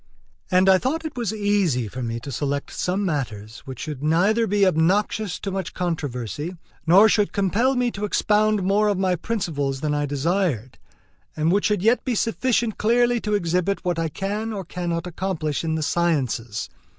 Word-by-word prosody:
And 185 0 +4
I 190 -1 +6
thought 310 - -1
that 315 - -3
it - - -34
was 235 -5 -2
easy 205 - +1
for 130 +5 -6
me 115 -1 -3
to 140 - -7
select 140 +2 -3
some 190 +3 -1
matters 115 - -3
which 130 -3 -8
should 150 -4 -5
neither 195 +9 +2
be 200 0 +3
obnoxious 185 +3 +1
to 195 - -3
much 190 -2 -4
controversy, 150 - -3 0.3
nor 195 +6 +7
should 210 -1 +2
compel 210 +7 +1
me 245 -1 +1
to 200 - -6
expound 210 0 +2
more 200 +3 +2
of 205 -2 +1
my 185 -1 +1
principles 150 -9 -2
than 150 -1 0
I 145 0 0
desired, 145 - -1 0.6
and 155 +2 +2
which 200 +2 +2
should 210 -3 +1
yet 230 +2 +3
be 250 -3 -1
sufficient 230 0 0
clearly 240 +1 +3
to 210 -1 0
exhibit 180 +1 0
what 175 -2 0
I 165 -1 0
can 205 +7 -3
or 195 -4 -5
cannot 170 0 -3
accomplish 170 -4 -2
in 160 -1 -1
the 160 - -1
sciences. 135 -10 -1
180 Hz, 185 wpm, -23 LUFS, 150-210 Hz, 0.6 s, nor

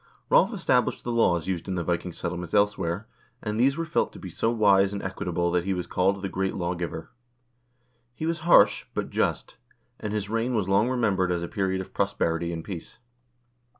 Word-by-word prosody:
Rolv - - +5
established - - +1
the 120 - -3
laws 90 -8 +2
used 90 -2 -3
in 95 - -2
the 85 - -1
Viking 85 +1 -2
settlements 85 +2 -4
elsewhere, 100 -2 +1 0.4
and 105 +1 -2
these 135 +3 +3
were 165 - -1
felt 165 - 0
to - - -10
be 95 - -8
so 100 +6 0
wise 100 -4 +4
and 100 - -4
equitable 90 -2 -1
that 90 0 +1
he 95 +1 -1
was 90 - -3
called 95 +2 0
the - - 0
great 95 +1 -2
lawgiver. 85 -2 -4 1.0
He 155 - -4
was 165 0 -1
harsh, 170 +2 +5
but - - -3
just, - - -1 0.4
and 105 - -4
his 105 -2 -2
reign 115 +3 -1
was 105 -4 0
long 100 +5 +3
remembered 100 -8 +1
as 85 -1 -1
a - - -3
period 95 0 -1
of 95 - -10
prosperity 85 +1 0
and 80 -1 -5
peace. 90 -4 -8
95 Hz, 195 wpm, -26 LUFS, 85-105 Hz, 1.0 s, Rolv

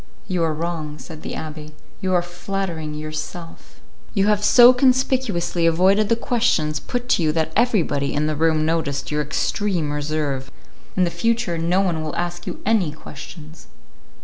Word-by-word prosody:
"You 180 -3 0
are 160 -1 +1
wrong," 155 -2 -4
said 155 0 -10
the - - -6
abbé, 155 -1 -7 0.3
"you 185 - -1
are 175 - +2
flattering 175 -3 -4
yourself. 155 -4 -7 0.4
You 195 -1 +3
have 210 -1 +2
so 245 +3 +8
conspicuously 255 -9 +2
avoided 190 +5 +3
the 230 - +4
questions 225 -11 +1
put 245 0 -4
to - - +3
you 155 -2 +2
that 160 0 0
everybody 180 - +1
in 150 +1 +1
the 155 0 -1
room 155 0 +2
noticed 155 -4 -1
your 150 0 0
extreme 165 +2 -1
reserve. 145 -3 -2 0.5
In 185 - +4
the 175 - +1
future 230 -7 0
no 175 +4 +2
one 175 -5 0
will 155 -1 -4
ask 175 0 -3
you - - -5
any 205 -7 +2
questions." 155 +1 -11
165 Hz, 165 wpm, -22 LUFS, 155-195 Hz, 0.5 s, so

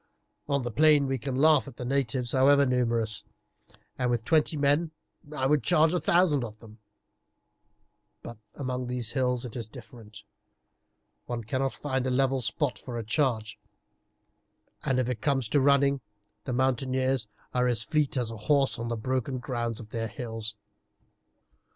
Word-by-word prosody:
On 140 -2 +1
the 120 - -3
plain 150 +2 +5
we 135 -1 -1
can 135 +1 -4
laugh 150 +1 +4
at 120 - -11
the 125 - -5
natives, 125 -2 0
however 140 +1 +5
numerous, 115 -4 0 0.8
and 125 -1 +1
with 120 -2 -1
twenty 155 -1 +2
men 145 +4 +2 0.4
I 135 -3 -2
would 145 +1 +3
charge 160 +3 +4
a 180 - +2
thousand 170 -7 +3
of 110 -2 -7
them; 110 0 -15 1.4
but 120 -2 -9 0.2
among 125 -2 -3
these 125 -2 -3
hills 125 -1 0
it 120 - -8
is 115 -3 -4
different, 110 -1 -12 1.0
one 120 -1 -4
cannot 130 +4 -1
find 130 -3 -2
a - - +1
level 135 +1 +1
spot 125 +4 -1
for 120 -2 -6
a 115 - -3
charge, 110 -4 0 1.2
and, 130 - +1
if 130 -2 +1
it 125 -3 -3
comes 135 -5 +1
to 145 - +3
running, 140 0 +3 0.4
the 130 - -2
mountaineers 130 -1 0 0.3
are 125 0 +2
as 115 -2 0
fleet 150 +3 0
as 120 -3 -1
a 115 - -7
horse 135 +5 +1
on 115 - -3
the 115 0 -2
broken 130 +3 -2
ground 120 -2 -3
of 110 -3 -10
their 115 0 -3
hills." 115 -2 -5
130 Hz, 165 wpm, -28 LUFS, 115-140 Hz, 1.4 s, plain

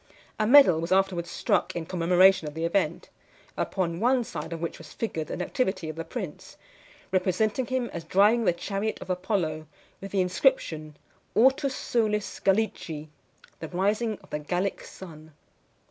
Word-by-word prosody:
A 215 - +2
medal 240 - +7
was 165 +2 -4
afterwards 190 -2 +1
struck 185 - 0
in 170 -2 -3
commemoration 180 0 +4
of 150 - -7
the 165 +1 -2
event; 195 +4 -1 0.4
upon 170 -3 -2
one 245 +3 +3
side 170 - -6
of 165 - -4
which 170 0 -4
was 160 - -12
figured 160 -9 -3
the - - -5
nativity 185 - -2
of 155 - -6
the 165 - -4
prince, 190 -7 -7 0.5
representing 200 +6 +1
him 255 -2 -1
as 170 - -5
driving 210 +6 +3
the - - +5
chariot 195 +5 -3
of - - -5
Apollo, 175 -5 -2 0.3
with 195 - -6
the 195 -1 +1
inscription 180 - 0 0.4
"Ortus 265 +3 +3
solis 210 -3 -1
Gallici," 180 -7 -1 0.5
the 160 - -5
rising 205 +5 0
of - - -20
the 150 - -2
Gallic 180 +6 -2
sun. 160 -4 -12
185 Hz, 160 wpm, -27 LUFS, 165-215 Hz, 0.5 s, medal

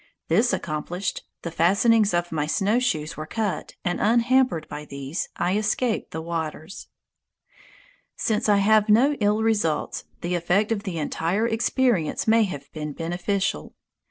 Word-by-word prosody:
This 240 +2 +3
accomplished, 170 +4 -3 0.2
the 170 - -4
fastenings 200 +6 +3
of 175 0 -1
my 150 -2 -1
snowshoes 195 -5 0
were 155 0 -6
cut, 215 -1 -3
and 175 0 -1
unhampered 235 -4 +2
by 150 0 -7
these, 140 +2 -5
I 180 +2 0
escaped 215 +2 0
the 160 - -5
waters. 160 +1 -5 1.3
Since 220 0 0
I 205 - +5
have 210 +1 +4
felt 210 - +6
no 270 +6 +4
ill 210 +1 +2
results, 205 -9 0 0.2
the 175 +1 -2
effect 180 +5 +1
of 215 -3 0
the 180 -4 -3
entire 170 +7 -1
experience 230 - +1
may 225 0 +5
have 145 -7 -7
been 150 -1 -5
beneficial. 180 +5 -2
195 Hz, 145 wpm, -24 LUFS, 165-220 Hz, 1.3 s, felt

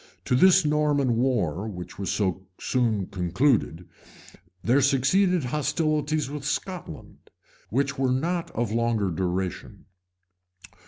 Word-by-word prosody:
To - - -1
this 185 +3 +5
Norman 145 -5 +1
war, 110 - 0
which 90 -4 -8
was 100 - -3
so 95 -2 -1
soon 115 -6 0
concluded, 90 - 0 0.8
there 130 +5 +3
succeeded 155 +7 +2
hostilities 150 +1 0
with 145 0 -6
Scotland, 150 - -5 0.4
which 140 +3 -1
were 130 -1 +2
not 170 +6 -1
of 115 -1 -1
longer 115 -4 0
duration. 90 +1 -3
125 Hz, 110 wpm, -25 LUFS, 100-150 Hz, 0.8 s, this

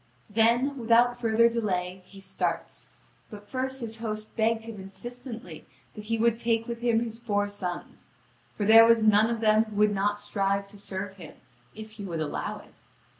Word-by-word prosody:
Then, 240 +6 +2
without 240 +1 +3
further 230 0 +4
delay, 190 -5 -2
he 195 +1 -14
starts. 195 0 -3 0.4
But 205 -2 -11
first 265 0 -3
his 225 -1 -5
host 215 -1 -5
begged 225 0 +1
him 225 -4 -8
insistently 225 - -9 0.3
that 210 - -9
he 230 +1 -1
would 230 0 +2
take 230 -1 0
with 235 -1 -5
him 235 -2 +2
his 230 -1 -5
four 205 -3 0
sons: 185 -4 -6 0.5
for 205 - -1
there 225 +2 +9
was 230 -1 +5
none 215 +1 +5
of 230 -1 -2
them 215 0 +4
who 215 -1 -10
would 210 0 +3
not 205 +1 0
strive 200 -1 -1
to 205 - -11
serve 195 0 -5
him, 165 -5 -11 0.4
if 215 0 -9
he 215 -1 -9
would 170 -4 -4
allow 155 -2 -3
it. - - -21
220 Hz, 180 wpm, -27 LUFS, 205-230 Hz, 0.5 s, there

